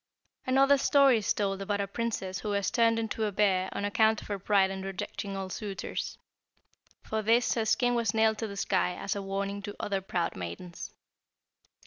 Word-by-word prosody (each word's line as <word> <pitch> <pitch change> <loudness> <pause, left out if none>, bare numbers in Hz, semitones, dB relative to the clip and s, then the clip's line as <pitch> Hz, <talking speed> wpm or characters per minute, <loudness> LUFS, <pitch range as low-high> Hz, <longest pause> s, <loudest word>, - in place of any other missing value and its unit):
"Another 275 +2 +5
story 275 -4 +5
is 205 - -1
told 195 -1 -1
about 205 +1 -1
a 200 - 0
princess 195 -3 -3
who 210 - -4
was 200 -2 0
turned 230 -1 +3
into 225 -1 -1
a 210 - -1
bear 190 -2 +2
on 200 - -3
account 220 +1 +3
of - - -12
her 200 -1 -2
pride 195 0 +3
in 190 0 -5
rejecting 195 +1 -5
all 190 -1 -5
suitors. 200 -2 -4 0.9
For 220 0 -2
this 230 +3 +3
her 225 -2 0
skin 245 +3 +2
was 235 -3 +1
nailed 220 0 +2
to 225 - -2
the 200 -1 -8
sky 185 -2 +1
as 200 - -3
a 200 - -3
warning 195 +1 -3
to 205 0 -7
other 195 -2 -1
proud 175 -3 -2
maidens. 95 - -7
205 Hz, 190 wpm, -29 LUFS, 195-225 Hz, 0.9 s, Another